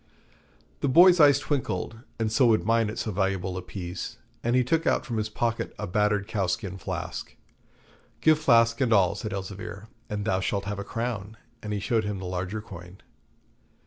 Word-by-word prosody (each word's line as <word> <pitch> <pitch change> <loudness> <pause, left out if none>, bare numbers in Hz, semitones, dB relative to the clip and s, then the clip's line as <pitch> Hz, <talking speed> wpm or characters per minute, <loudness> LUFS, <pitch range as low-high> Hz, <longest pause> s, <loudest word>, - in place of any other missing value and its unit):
The - - 0
boy's 175 +6 +7
eyes 145 -3 +7
twinkled, 140 -5 -2 0.2
and 110 -1 -1
so 125 +2 +4
would 110 -6 +3
mine 115 -1 +2
at 110 - -6
so 110 - -2
valuable 95 -1 -1
a 95 - -3
piece, 90 0 -6 0.3
and 120 +1 +1
he 125 - +4
took 160 +6 0
out - - +2
from 115 -3 -3
his 110 0 -1
pocket 115 +1 -2
a - - -3
battered 105 +1 +1
cowskin 100 -2 -2
flask. - - -5 0.8
'Give 155 -1 +4
flask 115 -5 +4
and 125 -3 +2
all,' 100 -4 +4
said 110 +1 -5
Elzevir, 100 +1 -6 0.2
'and 105 -1 -3
thou 95 -4 +1
shalt 100 +1 -1
have 105 0 -4
a - - -3
crown,' 110 -1 -4 0.2
and 105 - -5
he 105 - -1
showed 110 +2 0
him 105 -1 -3
the 95 - -6
larger 95 +4 -3
coin. 90 -2 -11
105 Hz, 185 wpm, -27 LUFS, 95-115 Hz, 0.8 s, boy's